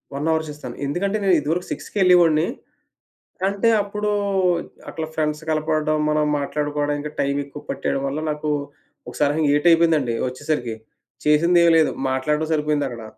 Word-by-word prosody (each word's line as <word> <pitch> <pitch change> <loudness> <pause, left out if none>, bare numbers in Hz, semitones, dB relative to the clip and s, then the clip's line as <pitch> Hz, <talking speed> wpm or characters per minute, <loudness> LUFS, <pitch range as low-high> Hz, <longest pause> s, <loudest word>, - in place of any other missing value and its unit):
1 145 +3 -2
hour 160 0 0
చేస్తాను. 145 -5 -8
ఎందుకంటే, 195 +9 -1
నేను 190 -2 +4
ఇదివరకు 165 +5 -2
సిక్స్‌కెళ్ళేవాడిని. 175 -5 +3 1.0
కంటే 200 +4 +2
అప్పుడు 210 +1 -3 0.8
అట్లా 160 -1 -4
ఫ్రెండ్స్ 150 0 -1
కలపడ్డం, 155 0 0
మనం 150 0 +2
మాట్లాడుకోవడం 145 0 -2
ఇంకా 150 +1 -5
టైం 140 0 0
ఎక్కువ 145 +1 -11
పట్టేయడం 135 0 -2
వల్ల 140 +3 -3
నాకు 150 0 -3 0.6
ఒకసారి 145 -1 0 0.2
8 145 +3 +1
అయిపోయిందండి 165 -7 +3
వచ్చేసరికి. 130 -3 -3 0.5
చేసిందేమి 170 +3 +4
లేదు. 160 - +3 0.2
మాట్లాడడం 150 +4 0
సరిపోయిందక్కడ. 145 -6 -1
150 Hz, 130 wpm, -22 LUFS, 145-165 Hz, 1.0 s, నేను